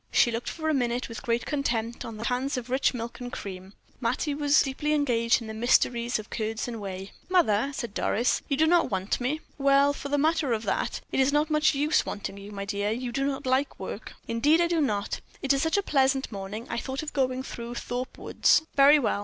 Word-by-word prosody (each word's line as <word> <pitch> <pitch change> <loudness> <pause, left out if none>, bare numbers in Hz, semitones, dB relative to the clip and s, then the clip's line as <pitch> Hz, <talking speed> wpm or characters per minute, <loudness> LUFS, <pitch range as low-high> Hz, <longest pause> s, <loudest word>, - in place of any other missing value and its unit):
She 240 - +4
looked 230 +1 -3
for 315 -1 -4
a 315 - +2
minute 245 -2 0
with 230 - -7
great 235 -2 -1
contempt 240 -5 -2
on 225 -2 -7
the 220 - -6
cans 255 +3 -1
of 250 0 -6
rich 265 +1 +3
milk 235 -1 -6
and 245 -1 -6
cream. 190 0 -7 0.3
Mattie 255 +5 -1
was 290 0 +4
deeply 295 +2 -1
engaged 240 -5 +2
in 225 - -7
the 220 - -5
mysteries 235 +1 +2
of 215 -1 -9
curds 220 +1 -2
and 230 -3 -5
whey. 190 0 -6 0.2
"Mother," 275 - +3
said 235 -6 -4
Doris, 235 +4 +1
"you 275 - 0
do 315 - +4
not 345 +1 +3
want 190 +4 -1
me?" 290 +6 -1 0.2
"Well, 275 +1 +4
for 285 - -6
the 290 - +1
matter 310 -3 +2
of 220 0 -2
that, - - -1
it - - 0
is 265 +1 +4
not 300 +2 +1
much 305 0 +3
use 295 +3 +2
wanting 200 -1 -5
you, 200 +1 -10
my 200 -1 -5
dear; 205 0 -1
you 240 +3 -3
do 275 +2 -1
not 270 -1 -3
like 260 +2 0
work." - - -7
"Indeed 280 +8 +3
I 345 - +4
do 340 -2 +1
not. 205 -7 -1 0.2
It 275 0 +3
is 275 - +1
such 320 +4 +1
a 405 - +1
pleasant 270 -5 +2
morning, 200 +3 -6
I 235 - -2
thought 265 +3 -4
of 305 - -6
going 260 -2 0
through 235 -2 -7
Thorpe 245 +2 -4
Woods." - - +3
"Very 280 +2 +7
well. 235 -7 0
255 Hz, 230 wpm, -27 LUFS, 230-285 Hz, 0.3 s, Very